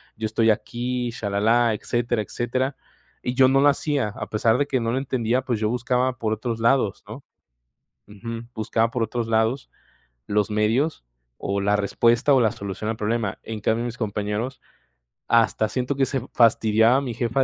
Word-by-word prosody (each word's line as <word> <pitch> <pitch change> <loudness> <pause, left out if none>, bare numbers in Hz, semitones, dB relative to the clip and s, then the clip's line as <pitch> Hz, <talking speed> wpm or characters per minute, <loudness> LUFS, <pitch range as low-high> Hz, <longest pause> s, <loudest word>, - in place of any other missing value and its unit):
yo 110 - -4
estoy 110 +1 +3
aquí, 120 +3 -2
shalalá, 115 +2 +1
etcétera, 120 +1 -1
etcétera. 130 +6 -2 0.5
Y 125 - -2
yo 130 0 +6
no 135 +1 +3
lo 145 - +5
hacía, 145 -3 0
a 110 - -5
pesar 110 +2 +2
de 145 - +1
que 130 -2 0
no 115 -1 -1
le - - 0
entendía, 125 -2 0
pues, 120 -5 -2
yo 105 - 0
buscaba 125 +1 0
por 110 -2 -1
otros 115 +1 -3
lados, 115 -3 +1
¿no? - - -9 0.9
Ujú, 115 +3 -7
buscaba 115 +1 0
por 125 -3 -1
otros 115 +1 -3
lados, 115 +4 0 0.6
los 105 +1 +1
medios 110 - +1 0.3
o 100 0 -2
la 100 +1 +2
respuesta, 115 +6 +2
o 130 - +4
la 110 -2 +3
solución 100 +2 -5
al - - -4
problema. 110 -2 -2
En 110 -1 -6
cambio, 110 +3 +1
mis 120 0 -5
compañeros 105 +3 -3 0.7
hasta 115 -2 +2
siento 130 +3 -2
que 135 -1 +1
se 135 -4 -2
fastidiaba 115 +1 +4
mi 130 -4 -4
jefa 120 +3 0
115 Hz, 175 wpm, -23 LUFS, 110-125 Hz, 0.9 s, yo